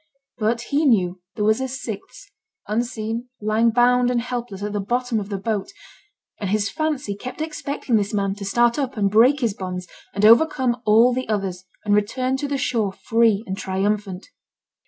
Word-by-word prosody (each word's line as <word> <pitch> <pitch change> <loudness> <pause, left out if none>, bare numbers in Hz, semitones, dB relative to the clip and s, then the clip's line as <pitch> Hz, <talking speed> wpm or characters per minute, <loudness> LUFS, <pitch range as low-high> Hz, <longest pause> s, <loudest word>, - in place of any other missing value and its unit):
But 230 +2 +1
he 285 +5 0
knew 185 -8 +2
there 210 - -1
was 220 +4 +3
a 265 - -1
sixth, 260 - -7 0.4
unseen, 230 +1 -2
lying, 215 +2 +2
bound 245 +1 +3
and 245 -1 +1
helpless, 235 -5 -5
at 210 0 -3
the 205 - -1
bottom 240 +3 -1
of 200 -1 -6
the 200 - -2
boat; 205 - -3 0.7
and 200 - -3
his 205 0 0
fancy 295 -9 -2
kept 255 +8 -8
expecting 290 -6 -1
this 205 -1 -1
man 195 -2 0
to 200 - -7
start 240 +6 +2
up 265 -3 -3
and 200 -2 +1
break 250 +7 +5
his 230 -4 +1
bonds, 180 -2 -5 0.3
and 200 +1 +2
overcome 245 0 +4
all 230 +4 +6
the 255 -1 -3
others, 190 -3 -2 0.2
and 205 - +2
return 255 +6 +1
to 285 - -3
the 280 0 -1
shore 225 -6 0
free 225 0 +2
and 190 +1 -5
triumphant. 195 0 -2
225 Hz, 180 wpm, -22 LUFS, 205-250 Hz, 0.7 s, all